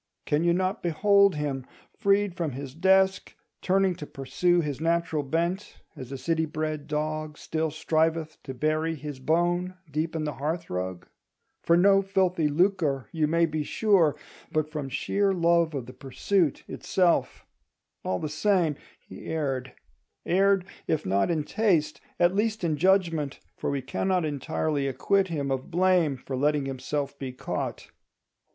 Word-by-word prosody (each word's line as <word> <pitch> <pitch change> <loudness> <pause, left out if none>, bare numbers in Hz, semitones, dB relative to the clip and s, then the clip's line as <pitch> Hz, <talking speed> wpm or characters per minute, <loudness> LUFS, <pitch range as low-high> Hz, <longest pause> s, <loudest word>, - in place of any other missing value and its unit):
Can 150 +2 +1
you 170 - +3
not 185 +4 0
behold 200 +3 +4
him, 145 -3 -2 0.3
freed 200 -3 +2
from 165 -6 -3
his 135 0 -7
desk, 190 +3 +2 0.3
turning 190 0 +2
to 150 -4 -7
pursue 175 +6 +1
his 145 -2 -4
natural 165 -2 +1
bent, 170 +7 -2 0.2
as 130 0 -9
a 135 - -4
city 160 +3 0
bred 155 -1 -3
dog 155 0 -3
still 160 0 -2
striveth 160 +1 0
to 130 -2 -7
bury 155 +4 0
his 145 -2 -7
bone 175 +5 0 0.2
deep 155 +3 -2
in 160 - -1
the 150 -1 -2
hearth 160 +5 -3
rug? 90 0 -4 0.5
For 170 - +4
no 195 +2 +5
filthy 185 -4 +1
lucre, 150 - +1
you 155 -2 +1
may 165 +2 +3
be 155 -1 -2
sure, 175 -2 +3 0.4
but 155 0 -1
from 150 -3 -4
sheer 195 +8 0
love 170 -2 +2
of 130 -4 -3
the 125 - -11
pursuit 155 +4 0
itself! 180 -2 0 0.6
All 95 - -1
the 155 - -3
same, 160 -1 +1 0.3
he - - -10
erred; 135 -5 -2 0.5
erred, 195 +1 +3 0.2
if 155 - 0
not 100 - +1
in 160 -3 0
taste, 155 -8 +1 0.2
at 175 +1 +4
least 215 0 0
in 160 -3 +1
judgment: 165 -4 +1 0.2
for - - -3
we 140 -2 -2
cannot 180 +6 0
entirely 145 0 -1
acquit 190 +9 +1
him 145 -5 -2
of 130 -1 -3
blame 175 -5 +2
for 130 +1 -6
letting 145 +1 +1
himself 140 +1 -3
be 135 -2 -4
caught. 130 - -5
160 Hz, 155 wpm, -27 LUFS, 145-180 Hz, 0.6 s, no